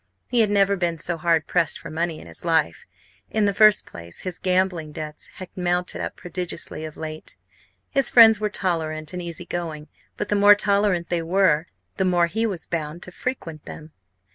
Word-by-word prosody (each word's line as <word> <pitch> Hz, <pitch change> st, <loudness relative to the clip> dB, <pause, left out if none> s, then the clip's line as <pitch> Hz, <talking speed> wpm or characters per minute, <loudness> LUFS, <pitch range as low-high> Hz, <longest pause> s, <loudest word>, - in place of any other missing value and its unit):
He 245 Hz, -, +2 dB
had 220 Hz, -2 st, +4 dB
never 200 Hz, -1 st, +3 dB
been 175 Hz, -3 st, -1 dB
so 170 Hz, +2 st, -2 dB
hard 165 Hz, -1 st, +1 dB
pressed 165 Hz, -, 0 dB
for 165 Hz, -, -9 dB
money 165 Hz, 0 st, -2 dB
in -, -, -12 dB
his -, -, -6 dB
life. 160 Hz, -, +1 dB, 0.4 s
In 215 Hz, -1 st, +1 dB
the 200 Hz, -, +2 dB
first 215 Hz, +1 st, +5 dB
place 85 Hz, 0 st, -10 dB
his 185 Hz, -2 st, -5 dB
gambling 180 Hz, -4 st, 0 dB
debts 155 Hz, 0 st, -7 dB
had 185 Hz, -, -9 dB
mounted 180 Hz, 0 st, -1 dB
up -, -, -4 dB
prodigiously 175 Hz, -3 st, -5 dB
of 155 Hz, -, -9 dB
late. 155 Hz, -9 st, -7 dB, 0.5 s
His 275 Hz, -3 st, +2 dB
friends 225 Hz, -3 st, +8 dB
were 210 Hz, 0 st, 0 dB
tolerant 160 Hz, -5 st, -2 dB
and 180 Hz, -, -4 dB
easy 170 Hz, 0 st, -7 dB
going. 160 Hz, -4 st, -5 dB, 0.3 s
But 210 Hz, -, -3 dB
the 205 Hz, -, +2 dB
more 205 Hz, 0 st, +7 dB
tolerant 200 Hz, -4 st, +1 dB
they 175 Hz, -1 st, 0 dB
were 170 Hz, -2 st, +2 dB, 0.3 s
the 190 Hz, -, +1 dB
more 175 Hz, -2 st, +3 dB
he 220 Hz, +7 st, -1 dB
was 185 Hz, -6 st, -5 dB
bound 165 Hz, 0 st, -4 dB
to 180 Hz, -, -9 dB
frequent 165 Hz, -, -5 dB
them. 155 Hz, 0 st, -10 dB
175 Hz, 190 wpm, -23 LUFS, 160-200 Hz, 0.5 s, friends